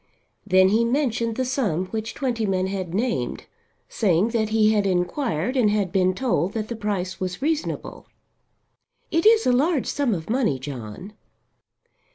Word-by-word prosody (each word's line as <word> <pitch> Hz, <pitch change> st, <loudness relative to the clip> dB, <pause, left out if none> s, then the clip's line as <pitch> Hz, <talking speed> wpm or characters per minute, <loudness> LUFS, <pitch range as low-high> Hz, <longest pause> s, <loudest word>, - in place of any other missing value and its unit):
Then 185 Hz, -1 st, +5 dB
he 220 Hz, +3 st, +3 dB
mentioned 235 Hz, -3 st, 0 dB
the 260 Hz, -, -1 dB
sum 215 Hz, -, -1 dB
which 220 Hz, 0 st, -4 dB
Twentyman 220 Hz, -8 st, -1 dB
had 190 Hz, -3 st, -4 dB
named, 230 Hz, +6 st, -2 dB, 0.4 s
saying 195 Hz, 0 st, +1 dB
that 225 Hz, -2 st, 0 dB
he 215 Hz, -1 st, +3 dB
had 205 Hz, -2 st, +2 dB
inquired 185 Hz, -, -1 dB
and 240 Hz, -5 st, +3 dB
had 205 Hz, -3 st, 0 dB
been 185 Hz, 0 st, +2 dB
told 205 Hz, -5 st, 0 dB
that 215 Hz, -1 st, -3 dB
the 235 Hz, -, -3 dB
price 195 Hz, -4 st, -3 dB
was 185 Hz, -1 st, -3 dB
reasonable. 315 Hz, 0 st, -3 dB, 1.0 s
"It 330 Hz, +4 st, +3 dB
is 450 Hz, 0 st, +5 dB
a -, -, +4 dB
large 280 Hz, +3 st, +2 dB
sum 275 Hz, -7 st, 0 dB
of 160 Hz, -2 st, -6 dB
money, 225 Hz, -, +1 dB
John." 130 Hz, -, -8 dB
215 Hz, 155 wpm, -23 LUFS, 185-245 Hz, 1.0 s, Then